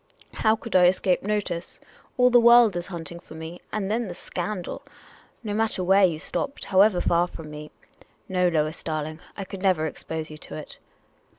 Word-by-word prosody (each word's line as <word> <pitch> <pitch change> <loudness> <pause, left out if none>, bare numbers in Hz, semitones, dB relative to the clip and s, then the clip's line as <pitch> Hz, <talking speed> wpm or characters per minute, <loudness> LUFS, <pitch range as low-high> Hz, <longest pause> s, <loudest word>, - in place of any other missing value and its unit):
"How 220 0 +2
could 225 -1 -7
I 180 -1 +7
escape 185 0 +2
notice? 195 -4 -3 0.4
All 250 0 +5
the 245 - +7
world 235 -3 +7
is 175 0 -3
hunting 170 -1 -7
for 160 - -13
me. 160 +2 -8
And 205 -2 -2
then 230 0 0
the 175 - -6
scandal! 180 +1 -5 0.6
No 210 -2 -3
matter 215 -3 0
where 190 +2 +5
you 170 -4 0
stopped 275 - -3
— - - -10
however 195 0 +5
far 175 0 +2
from 160 -3 -10
me 150 0 -8 0.3
— - - -28
no, 180 -1 +2
Lois 155 -1 0
darling, 155 0 -4 0.2
I 200 - -3
could 190 0 -8
never 185 -5 +2
expose 160 0 -5
you 155 - -10
to 80 - -9
it." - - -9
180 Hz, 195 wpm, -25 LUFS, 160-210 Hz, 0.6 s, I